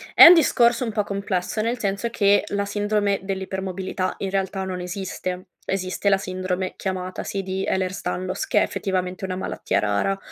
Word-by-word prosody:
è - - +11
un 340 - +12
discorso 245 -7 +4
un 230 - -2
po' 210 -1 0
complesso, 200 0 -2
nel 235 +3 0
senso 200 0 -1
che 205 -3 +3
la 200 0 -1
sindrome 205 0 0
dell'ipermobilità 190 -1 -3
in 195 -1 -3
realtà 195 0 -1
non 185 -1 -4
esiste. 185 0 -5 0.2
Esiste 190 +1 -1
la 195 - +4
sindrome 185 0 -3
chiamata, 185 -1 -4
sì, 195 -1 -3
di 190 +1 -3
Ehlers-Danlos, 185 0 -2
che - - 0
è - - +3
effettivamente 185 0 -2
una 185 -1 -2
malattia 185 - -2
rara, 105 - 0
190 Hz, 170 wpm, -23 LUFS, 185-200 Hz, 0.2 s, un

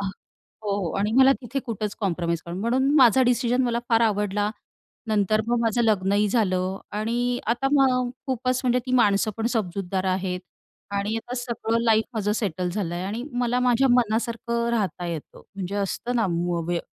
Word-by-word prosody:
अ, - - -3 0.4
हो, 210 -2 -8
हो. 180 -5 -2
आणि 210 +2 0
मला 265 0 +7
तिथे 245 +1 -4
कुठंच 215 -3 -3
कॉम्प्रोमाइज 170 -4 -1
कर 170 - -6
म्हणून 240 +8 +1
माझा 260 -2 +6
डिसिजन 245 0 +2
मला 235 -1 0
फार 230 -1 +4
आवडला. 205 0 -1 0.6
नंतर 215 0 +2
मग 240 0 +2
माझं 230 +1 +1
लग्नही 205 -1 +2
झालं 190 -4 0 0.2
आणि 240 +3 0
आता 240 +5 +1
मग 255 -3 +3 0.2
खूपच 255 -1 0
म्हणजे 250 0 +3
ती 255 - -3
माणसं 215 -3 +3
पण 225 0 -1
समजूतदार 190 -2 -2
आहेत. 185 -1 -1 0.5
आणि 200 +2 -1
आता 240 +2 -5
सगळं 230 -1 -1
लाईफ 220 -1 +4
माझं 210 -2 0
सेटल 185 -5 -2
झालं 180 -3 -3
आहे. 175 +1 -3
आणि 215 +5 -3
मला 245 0 0
माझ्या 250 +1 +3
मनासारखं 235 0 +1
राहता 200 -6 -1
येतं. 165 -3 -7
म्हणजे 195 0 -5
असतं 245 +5 -3
ना 225 -3 +2 0.4
व्य 175 -1 0
220 Hz, 170 wpm, -24 LUFS, 195-240 Hz, 0.6 s, मला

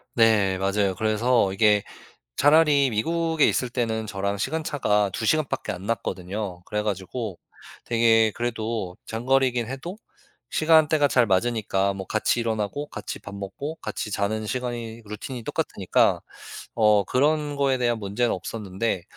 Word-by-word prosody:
네. 105 -5 +4
맞아요. 100 0 +1
그래서 110 -1 +2
이게 105 0 +4 0.5
차라리 145 -2 +5
미국에 165 +7 +1
있을 125 - +1
때는 110 -3 -2
저랑 100 0 -2
시간차가 130 -6 0
2 110 - -3
시간밖에 155 -2 0
안 95 +2 -8
났거든요. 95 -3 -3
그래 105 0 -2
가지고 100 0 -4 0.5
되게 115 -2 +3
그래도 115 -5 -3
장거리긴 125 0 +1
해도 135 +9 -6 0.5
시간대가 155 -2 +4
잘 125 -2 +4
맞으니까 100 -1 +1
뭐 95 -1 -6
같이 110 +2 +1
일어나고 115 +5 -2
같이 - - -7
밥 100 0 -9
먹고 100 +11 -6
같이 105 - -5
자는 110 +2 -1
시간이 120 -1 -4
루틴이 115 +3 -7
똑같으니까 - - +1 0.5
어 105 -3 +4
그런 145 +2 +1
거에 135 -2 +2
대한 120 -2 0
문제는 105 +4 0
없었는데 95 0 -3
115 Hz, 315 characters per minute, -25 LUFS, 100-130 Hz, 0.5 s, 차라리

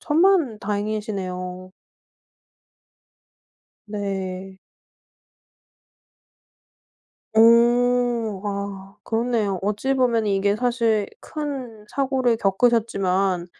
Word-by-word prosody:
천만다행이시네요. 210 - -1 2.1
네. 195 -2 -5 2.8
오 235 -2 +4
아 200 -1 -5
그렇네요. 225 -4 0
어찌 210 +7 -1
보면은 235 -4 +1
이게 200 +1 +1
사실 230 -4 +1
큰 265 -8 -6
사고를 260 -3 +1
겪으셨지만 195 -4 +1
215 Hz, 145 characters per minute, -23 LUFS, 195-245 Hz, 2.8 s, 오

